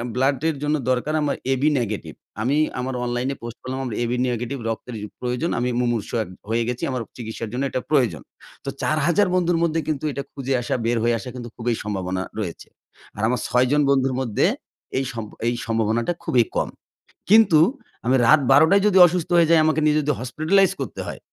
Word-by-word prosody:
ব্লাডের 135 +4 +1
জন্য 150 +1 +1
দরকার 130 +4 0
আমার 145 -1 0 0.2
এ-বি 135 +4 +2
নেগেটিভ। 110 -4 -4 0.3
আমি 135 +6 +1 0.2
আমার 130 +1 -3
অনলাইনে 125 +3 -2
পোস্ট 120 0 -7
করলাম 130 +1 -5
আমার 120 -4 -4
এ-বি 120 +1 -1
নেগেটিভ 125 +3 -3
রক্তের 115 +2 -5
প্র 105 - -6
প্রয়োজন, 125 +7 -1
আমি 125 +1 0
মুমূর্ষু 120 -3 -1
এক 100 - -12 0.2
হয়ে 115 +1 +1
গেছি। 125 0 -3
আমার 125 -2 -2 0.2
চিকিৎসার 110 -1 -6
জন্য 130 +3 -1
এটা 130 - -2
প্রয়োজন। 120 - +2 0.4
তো - - -2
৪ 160 +6 +2
বন্ধুর 175 -1 +2
মধ্যে 165 -1 +1
কিন্তু 155 -2 -2
এটা 140 0 -4
খুঁজে 135 -1 -2
আসা 120 - -2
বের 120 +1 +1
হয়ে 120 0 +2
আসা 110 - -7
কিন্তু 120 -1 -7
খুবই 120 0 -1
সম্ভাবনা 95 -3 -3 0.2
রয়েছে। 90 -6 -5 0.5
আর - - -4
আমার 125 0 0
৬ 125 +1 +3
জন 150 0 +4
বন্ধুর 135 -1 +2
মধ্যে 115 -5 +1 0.5
এই 135 - +1
সম 115 -2 -5 0.2
এই 120 - +2
সম্ভাবনাটা 115 +6 0
খুবই 120 -2 +3
কম। - - 0 0.6
কিন্তু 215 -7 +6 0.5
আমি 130 - +3
রাত 155 - +7
১২ 145 +4 +7
টায় 200 0 +5
যদি 195 -2 +3
অসুস্থ 175 -1 -2
হয়ে 165 -2 +4
যাই 165 - +6
আমাকে 155 -1 +2
নিয়ে 150 0 +3
যদি 150 0 0
হসপিটালাইজ 160 +10 +2
করতে - - -5
হয়, - - -6
130 Hz, 195 wpm, -22 LUFS, 120-150 Hz, 0.6 s, রাত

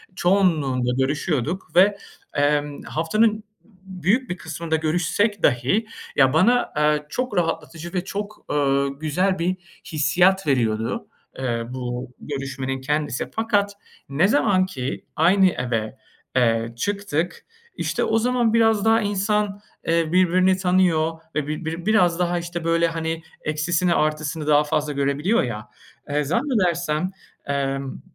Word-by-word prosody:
çoğunluğunda 155 -10 +2
görüşüyorduk. 150 +4 -1
Ve, 200 +3 +5 0.4
emm, 145 0 +1
haftanın 215 +8 +1 0.3
b 185 -4 -14
büyük 250 +8 +2
bir 180 - -3
kısmında 160 0 -3
görüşsek 175 +6 0
dahi 135 - +2 0.3
ya 135 0 +4
bana, 235 +10 +4
aaa, 150 0 +1
çok 250 -1 -3
rahatlatıcı 165 +1 -2
ve 180 -1 -1
çok, 205 +2 -6
ııı, 140 -1 +1
güzel 180 +5 0
bir 180 +2 0 0.3
hissiyat 175 +5 +2
veriyordu, 115 -5 0 0.3
ııı, 120 -1 -3
bu 125 0 -5
görüşmenin 135 -2 -4
kendisi. 150 -2 -2
Fakat 205 -3 0 0.4
ne 155 +7 +3
zamanki 185 - 0
aynı 190 +4 +5
eve, 120 -4 -3 0.4
eee, 115 -2 +2
çıktık, 195 -1 -2 0.3
işte - - -1
o 225 - +2
zaman 240 -1 +1
biraz 225 -2 +3
daha 225 0 +4
insan, 205 0 0 0.3
eee, 165 -1 +1
birbirini 185 +1 +4
tanıyor 180 -4 +2 0.2
ve 150 -2 -1
bir 155 +2 -4
bir 165 +2 -4
biraz 180 -6 +3
daha, 175 -1 +1
işte, 175 0 -5
böyle, 165 0 +2
hani, 165 0 -3 0.2
eksisini 165 +3 +1
artısını 155 0 -1
daha 150 0 +5
fazla 150 -1 -1
görebiliyor 140 +9 +1
ya. 110 -3 -5 0.4
Iıı, 145 0 0
zannedersem, 180 - 0 0.3
emm, 135 -1 -2
165 Hz, 130 wpm, -23 LUFS, 145-190 Hz, 0.4 s, Ve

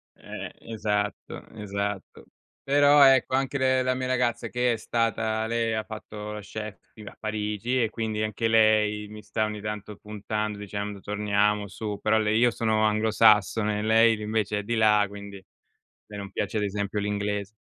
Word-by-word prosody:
Eh-eh, - - -8 0.2
esatto, 105 -2 -3
esatto. 100 -2 -5 0.4
Però 145 +1 +5
ecco, 135 -1 +5
anche 135 +1 0
le 130 -1 +2
la 130 0 0
mia 130 0 -3
ragazza 125 -2 0
che 125 0 +1
è - - -3
stata 110 0 -1
lei 115 0 0
ha 110 0 -1
fatto 105 -1 -8
la 105 - -6
chef 105 -1 -8
ti 110 - -13
a 105 - -10
Parigi, 110 +3 -2
e 110 - 0
quindi 110 -1 -3
anche 110 +1 -1
lei 110 -1 +3
mi 105 0 -11
sta 105 +1 -1
ogni 105 -1 -5
tanto 105 0 -6
puntando, 105 0 -4
dicendo: 100 0 -5
"Torniamo 105 0 0
su", 105 +1 -5
però 110 +1 +3
lei 110 0 +1
io 120 0 +4
sono 110 -2 0
anglosassone, 105 -1 +3
lei 110 0 +4
invece 105 -1 -1
è - - -5
di 115 +3 -2
là, 105 -2 +4
quindi 100 -1 -10 0.6
lei 105 - -9
non 100 -1 -7
piace 105 +2 -3
ad 105 - +1
esempio 100 0 -2
l'inglese. 105 -1 -2
105 Hz, 170 wpm, -26 LUFS, 105-115 Hz, 0.6 s, Però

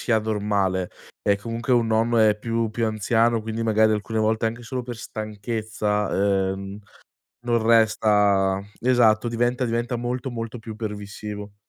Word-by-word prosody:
sia 115 -3 +2
normale 100 -4 -1 0.4
e 100 - +5
comunque 115 +5 -3
un 120 -2 +3
nonno 115 +1 +2
è 105 -1 +4
più 115 0 -1
più 115 +1 -1
anziano, 115 +1 +1
quindi 110 +1 -3
magari 110 0 +3
alcune 110 +1 -1
volte 110 +1 +1
anche 115 +2 -4
solo 125 +1 -4
per 120 -1 -6
stanchezza, 105 -3 -1
ehm, 95 +1 -7 0.7
non 120 -1 +2
resta 105 -4 +3 0.2
esatto 120 -3 +4
diventa 120 +2 0
diventa 120 +1 -1
molto, 125 +2 -3
molto 115 0 -5
più 110 -1 -8
permissivo. 105 -1 -6
110 Hz, 145 wpm, -24 LUFS, 105-115 Hz, 0.7 s, e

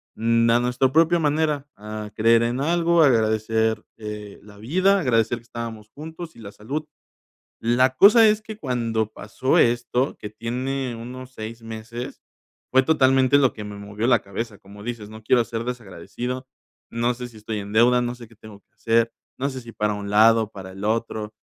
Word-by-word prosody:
mm, 115 +1 +2
a 120 - +4
nuestra 125 +2 +1
propia 165 +2 +4
manera, 150 -2 0
a 105 0 -7
creer 115 +1 +4
en 120 +2 -1
algo, 170 +1 +3
a 150 - +7
agradecer, 110 -1 +1 0.2
eh, 105 -1 -8
la 105 -1 -15
vida, 185 - +2
agradecer 115 - +1
que - - -21
estábamos 115 -2 -7
juntos 160 +3 -9
y - - -15
la 100 -2 -9
salud. 145 +10 -5 0.8
La 125 +3 +2
cosa 220 - +8
es 210 0 +1
que 220 -1 -8
cuando 115 -5 -1
pasó 110 +6 -1
esto, 120 +2 +1
que 105 - -7
tiene 125 +3 -3
unos 125 +2 -8
6 115 0 -8
meses, 115 +2 -7 0.5
fue 130 0 +6
totalmente 135 -2 +4
lo 130 -3 +3
que 105 - -8
me 105 0 -7
movió 100 +3 -4
la 120 -4 +5
cabeza, 105 +1 -6
como 105 0 -14
dices, 110 -3 -6
no 110 0 -11
quiero 120 +1 +3
ser 115 0 -4
desagradecido, 125 +3 -5 0.5
no 120 +1 0
sé 125 0 -7
si 115 - -17
estoy 110 0 -5
en 100 +1 -8
deuda, 120 +2 +5
no 120 0 -2
sé 120 -2 -11
qué 115 - -19
tengo 105 -2 -13
que - - -52
hacer, 115 0 +1 0.3
no 140 +2 0
sé 130 -1 -6
si 115 -1 -11
para 105 0 -1
un 100 0 -6
lado, 110 +1 +5
para 95 -2 -9
el 95 +1 -10
otro, 110 -1 -2
115 Hz, 190 wpm, -23 LUFS, 110-130 Hz, 0.8 s, cosa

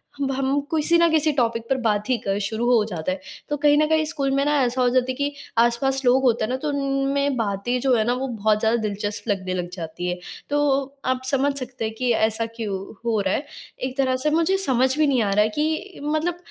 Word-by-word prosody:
हम 280 -1 -2
हम 270 +1 0
किसी 320 +2 +3
न 335 0 +4
किसी 315 -1 +3
टॉपिक 230 -2 +1
पर 270 - +2
बात 210 +1 +1
ही 255 - +3
कर 195 -2 -2
शुरू 220 +3 -2
हो 240 -3 +4
जाता 175 -2 -3
है। 185 - -3 0.3
तो 295 - 0
कहीं 295 0 +5
न 305 - +4
कहीं 315 0 +2
स्कूल 295 -3 -1
में 275 +1 +2
ना 295 - +2
ऐसा 250 +1 0
हो 250 - +4
जाता 250 0 +2
है - - -5
कि 285 +2 -2 0.2
आस-पास 240 +3 +2
लोग 250 +2 +5
होते 235 -3 +2
हैं - - -6
ना 255 - -1
तो 300 +3 -3
उनमें 275 0 0
बातें 225 +3 -1
जो 265 0 +2
हैं 220 - +2
ना 240 - +2
वो 260 +2 -2
बहुत 215 -3 +1
ज़्यादा 225 +2 +2
दिलचस्प 205 0 -3
लगने 185 -2 -1
लग 180 -1 -3
जाती 175 0 -5
हैं। 180 - -2 0.3
तो 290 0 +1 0.5
आप 255 0 0
समझ 280 +1 +2
सकते 250 -2 -5
हैं 220 - -3
कि 250 0 +1
ऐसा 220 +1 +1
क्यों 210 -4 -3 0.3
हो 225 -2 +1
रहा 190 -1 0
है। 285 - -2 0.4
एक 260 +1 -3
तरह 260 -2 +2
से 305 - +3
मुझे 330 +5 +2
समझ 260 -6 +1
भी 310 -1 +3
नहीं 260 -4 +2
आ 205 - 0
रहा 210 +1 +4
है 215 - 0
कि 315 +6 -2
मतलब, 310 +4 -1
255 Hz, 245 wpm, -23 LUFS, 220-285 Hz, 0.5 s, कहीं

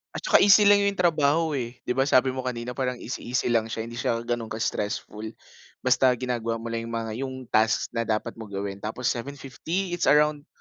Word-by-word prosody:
At - - -5
'tsaka - - +5
easy 205 +1 +7
lang 205 0 +6
yung 200 - 0
trabaho, 160 -2 +2
eh. 120 -2 -5
'Di - - -2
ba 135 +2 +1
sabi 130 -2 +4
mo 130 - -5
kanina 120 -1 -3
parang 125 0 -2
easy, 120 - -6
easy 125 0 0
lang 115 -1 +2
siya, 110 0 -4
hindi 120 +1 -7
siya 115 0 -1
gano'ng 120 -1 -2
ka-stressful. 110 0 -3 0.5
Basta 130 -1 +4
ginagawa 120 -2 -2
mo 115 - -7
lang 115 0 -3
yung 115 - -5
mga 115 -1 -3 0.2
yung 130 - -7 0.2
task 110 +1 +2
na 115 -1 -2
dapat 110 +1 -1
mong 110 -2 -9
gawin. 100 0 -4
Tapos 110 +4 -3
750, 140 +8 -4
it's 175 0 -1
around 150 0 +3
120 Hz, 210 wpm, -26 LUFS, 115-140 Hz, 0.5 s, easy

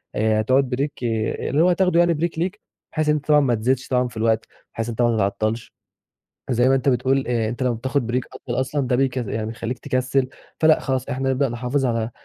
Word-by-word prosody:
آآ، 110 0 +2
هتقعد 130 +5 +3
بريك 135 +3 -1
اللي 115 +5 0
هو 175 - +5
هتاخده 180 -1 +3
يعني 175 0 +4
بريك 165 +1 -2
ليك، 185 +4 -2 0.3
بحيث 155 -1 0
ان 150 - +4
أنت 150 -1 -4
طبعًا 150 -1 +6
ما 130 -4 +2
تزيدش 130 +4 0
طبعًا 125 -1 +1
في 115 -2 -11
الوقت، 110 0 +1 0.3
بحيث 115 +1 -3
أنت 115 +1 -2
ما 120 -1 +3
تتعطلش 110 +3 -1 0.8
زي 120 +1 +3
ما 135 - +4
أنت 135 +1 0
بتقول 130 +1 +2
آآ، 115 -3 0
أنت 120 +4 -4
لمَّا 125 -2 +1
بتاخد 130 +2 -1
بريك 125 +2 -1
أطول 120 0 -4
أصلًا 130 +1 -1
ده 125 - +1
بيك 130 0 +1
يعني 110 -3 -2
بيخليك 115 +2 -4
تكسِّل 130 +1 0 0.3
فلأ 155 -1 +5
خلاص 130 -1 -2
إحنا 135 -1 -1
نبدأ 135 +1 +1
نحافظ 125 +3 -1
على 115 -1 -1
130 Hz, 215 wpm, -22 LUFS, 115-140 Hz, 0.8 s, طبعًا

